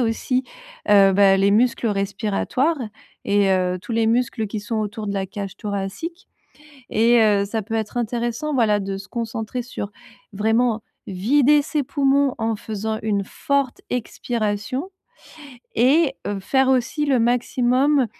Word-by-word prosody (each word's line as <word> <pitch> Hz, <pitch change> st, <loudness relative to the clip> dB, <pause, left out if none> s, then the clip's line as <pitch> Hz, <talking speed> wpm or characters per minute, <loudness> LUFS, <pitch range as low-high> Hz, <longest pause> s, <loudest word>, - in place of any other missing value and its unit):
aussi, 250 Hz, +2 st, 0 dB, 0.4 s
heu, 200 Hz, -2 st, +6 dB
bah, 195 Hz, 0 st, +5 dB
les 195 Hz, +1 st, +3 dB
muscles 230 Hz, +2 st, +2 dB
respiratoires 210 Hz, +9 st, -1 dB, 0.5 s
et 200 Hz, -1 st, +2 dB
heu, 185 Hz, -1 st, +1 dB
tous -, -, -11 dB
les 225 Hz, 0 st, +2 dB
muscles 230 Hz, -1 st, 0 dB
qui 210 Hz, +1 st, -5 dB
sont 215 Hz, +2 st, -4 dB
autour 215 Hz, 0 st, -3 dB
de -, -, -1 dB
la 195 Hz, -1 st, -2 dB
cage 195 Hz, -1 st, -6 dB
thoracique. 210 Hz, -, -5 dB, 0.6 s
Et 235 Hz, +2 st, +4 dB
heu, 205 Hz, -2 st, +3 dB
ça 220 Hz, +2 st, -3 dB
peut 225 Hz, +3 st, -7 dB
être 220 Hz, +1 st, -2 dB
intéressant, 240 Hz, +5 st, -2 dB
voilà, 220 Hz, -5 st, +3 dB
de 195 Hz, -1 st, -4 dB
se 195 Hz, -, -10 dB
concentrer 230 Hz, +1 st, -4 dB
sur, 215 Hz, -4 st, -6 dB, 0.4 s
vraiment, 225 Hz, +2 st, +1 dB, 0.3 s
vider 270 Hz, +10 st, +3 dB
ses 300 Hz, 0 st, -1 dB
poumons 275 Hz, 0 st, +2 dB
en 225 Hz, -1 st, -1 dB
faisant 220 Hz, +1 st, -4 dB
une 205 Hz, -2 st, 0 dB
forte 280 Hz, +5 st, -2 dB
expiration 240 Hz, -, -3 dB, 0.8 s
et 270 Hz, +4 st, +3 dB
heu, 205 Hz, -1 st, -2 dB
faire 265 Hz, +7 st, +2 dB
aussi 265 Hz, +3 st, +1 dB
le 275 Hz, -3 st, +2 dB
maximum, 250 Hz, +3 st, +2 dB
225 Hz, 145 wpm, -22 LUFS, 205-255 Hz, 0.8 s, heu